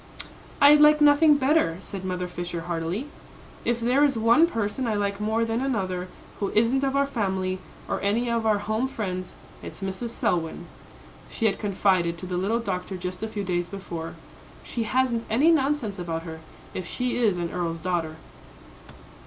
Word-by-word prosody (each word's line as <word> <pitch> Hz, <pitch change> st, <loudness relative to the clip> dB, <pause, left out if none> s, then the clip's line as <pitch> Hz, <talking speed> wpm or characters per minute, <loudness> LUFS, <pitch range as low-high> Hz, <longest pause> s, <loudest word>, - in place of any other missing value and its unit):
"I'd 295 Hz, +1 st, +7 dB
like 300 Hz, 0 st, +7 dB
nothing 295 Hz, +1 st, +6 dB
better," 280 Hz, -, +2 dB
said 195 Hz, -1 st, -8 dB
Mother 180 Hz, -1 st, -2 dB
Fisher, 175 Hz, -1 st, -5 dB
heartily. 170 Hz, +7 st, -3 dB, 0.6 s
"If 235 Hz, 0 st, 0 dB
there 250 Hz, +5 st, +3 dB
is 275 Hz, -5 st, +3 dB
one 235 Hz, +9 st, +5 dB
person 225 Hz, -2 st, -2 dB
I 220 Hz, -, 0 dB
like 200 Hz, 0 st, -1 dB
more 220 Hz, +2 st, +1 dB
than 230 Hz, +2 st, -1 dB
another, 190 Hz, -9 st, -1 dB, 0.3 s
who 200 Hz, -, -1 dB
isn't 235 Hz, +5 st, +3 dB
of 270 Hz, 0 st, 0 dB
our 280 Hz, 0 st, +3 dB
family, 190 Hz, -7 st, -2 dB, 0.3 s
or -, -, -2 dB
any 220 Hz, +5 st, +1 dB
of 235 Hz, -1 st, 0 dB
our 215 Hz, -1 st, +4 dB
home 215 Hz, +5 st, -1 dB
friends, 185 Hz, -7 st, -4 dB, 0.3 s
it's -, -, -8 dB
Mrs. 195 Hz, +5 st, -3 dB
Selwyn," 175 Hz, -6 st, -1 dB, 0.6 s
she 225 Hz, -, -2 dB
had 200 Hz, -3 st, +2 dB
confided 185 Hz, -4 st, +1 dB
to 185 Hz, -, -8 dB
the 180 Hz, 0 st, -3 dB
little 200 Hz, +6 st, +1 dB
doctor 190 Hz, -3 st, -3 dB
just 180 Hz, 0 st, -5 dB
a 220 Hz, -, -2 dB
few 215 Hz, -2 st, -4 dB
days 175 Hz, -2 st, -1 dB
before. 175 Hz, -4 st, -6 dB, 0.5 s
"She 230 Hz, -2 st, -3 dB
hasn't 250 Hz, -3 st, +1 dB
any 280 Hz, +10 st, +4 dB
nonsense 275 Hz, -, 0 dB
about 165 Hz, -2 st, -3 dB
her, 160 Hz, -1 st, -7 dB, 0.3 s
if 185 Hz, -2 st, -5 dB
she 250 Hz, -1 st, -2 dB
is 215 Hz, -7 st, +2 dB
an 170 Hz, -1 st, -3 dB
earl's 170 Hz, -2 st, -2 dB
daughter." 165 Hz, -2 st, -2 dB
205 Hz, 175 wpm, -25 LUFS, 180-245 Hz, 0.6 s, I'd